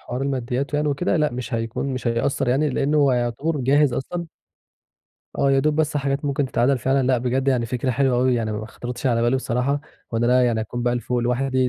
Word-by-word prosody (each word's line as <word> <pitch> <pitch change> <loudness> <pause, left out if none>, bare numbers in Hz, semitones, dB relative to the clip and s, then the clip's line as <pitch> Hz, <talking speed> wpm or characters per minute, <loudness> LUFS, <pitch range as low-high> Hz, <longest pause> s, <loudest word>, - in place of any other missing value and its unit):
حوار 125 +2 -5
الماديّات 135 +1 -2
يعني 150 +1 +1
وكده، 150 +6 0
لأ، 150 -4 +1
مش 125 +1 -4
هيكون 115 +3 -2
مش 130 - -5
هيأثر 120 +3 0
يعني، 140 +5 +2
لأنّه 140 +3 0
هو 140 -2 +4
يعتبر 125 +6 -1
جاهز 140 +2 +3
أصلًا. 170 +7 -4 1.1
آه، 140 - +3
يا 135 - +3
دوب 150 +2 +1
بس 155 -1 +1
حاجات 140 0 -1
ممكن 140 0 0
تتعدل 130 +1 +1
فعلًا، 135 +1 +1
لأ، 130 -1 +3
بجد 130 +2 0
يعني 125 -3 +1
فكرة 125 +2 -1
حلوة 130 0 +2
أوي 125 0 +3
يعني 110 -2 -1
م 105 - -3
ما 110 - -7
خطرتش 120 +3 -6
على 115 -2 +2
بالي 120 +2 +2
بصراحة، 130 +3 -1 0.3
وإن 115 0 0
أنا 125 +1 +4
يعني 115 -2 +1
أكون 120 +3 -4
بقى 120 0 +1
ل 120 - -1
فوق 125 +2 -2
لوحدي، 130 +2 +1
130 Hz, 225 wpm, -22 LUFS, 120-140 Hz, 1.1 s, هو